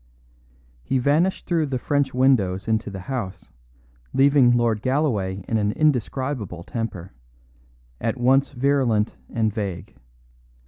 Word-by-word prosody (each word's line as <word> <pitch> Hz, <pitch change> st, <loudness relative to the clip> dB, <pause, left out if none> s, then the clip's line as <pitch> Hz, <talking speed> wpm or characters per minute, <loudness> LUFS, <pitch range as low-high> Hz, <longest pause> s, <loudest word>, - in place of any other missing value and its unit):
He 135 Hz, -, -1 dB
vanished 150 Hz, +9 st, +1 dB
through 165 Hz, -3 st, 0 dB
the 135 Hz, -2 st, -2 dB
French 140 Hz, +1 st, 0 dB
windows 120 Hz, -8 st, +2 dB
into 110 Hz, -1 st, 0 dB
the 95 Hz, -1 st, -7 dB
house, 100 Hz, -6 st, -5 dB, 0.6 s
leaving 140 Hz, -2 st, +5 dB
Lord 115 Hz, -3 st, +1 dB
Galloway 105 Hz, -, -1 dB
in 115 Hz, -, 0 dB
an 105 Hz, 0 st, 0 dB
indescribable 130 Hz, -, -1 dB
temper, 95 Hz, -5 st, -5 dB, 0.9 s
at 115 Hz, +2 st, -2 dB
once 135 Hz, +3 st, +3 dB
virulent 125 Hz, -5 st, +1 dB
and 110 Hz, -2 st, 0 dB
vague. 100 Hz, -6 st, -5 dB
120 Hz, 120 wpm, -23 LUFS, 105-135 Hz, 0.9 s, leaving